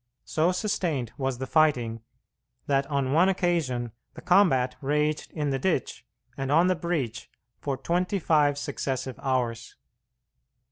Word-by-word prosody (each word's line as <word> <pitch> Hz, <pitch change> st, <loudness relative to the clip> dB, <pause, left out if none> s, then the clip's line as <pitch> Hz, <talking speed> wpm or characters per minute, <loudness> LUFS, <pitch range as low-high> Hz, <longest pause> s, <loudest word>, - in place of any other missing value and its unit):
So 160 Hz, +3 st, +1 dB
sustained 175 Hz, -, -1 dB
was 135 Hz, -2 st, -2 dB
the 130 Hz, -, -4 dB
fighting, 125 Hz, -7 st, +2 dB, 0.6 s
that 140 Hz, -1 st, +1 dB
on 140 Hz, -3 st, -1 dB
one 175 Hz, +5 st, +5 dB
occasion 165 Hz, -11 st, 0 dB, 0.2 s
the -, -, -9 dB
combat 170 Hz, -9 st, +4 dB
raged 150 Hz, +2 st, 0 dB
in 150 Hz, -3 st, -2 dB
the 135 Hz, -, -1 dB
ditch 130 Hz, -6 st, -1 dB, 0.3 s
and 135 Hz, 0 st, -3 dB
on 165 Hz, +4 st, +5 dB
the 185 Hz, 0 st, +3 dB
breach 160 Hz, -9 st, -3 dB, 0.3 s
for 140 Hz, -2 st, -2 dB
twenty 180 Hz, +8 st, 0 dB
five 150 Hz, -5 st, +2 dB
successive 135 Hz, -2 st, -3 dB
hours. 120 Hz, -4 st, -2 dB
145 Hz, 135 wpm, -27 LUFS, 130-170 Hz, 0.6 s, one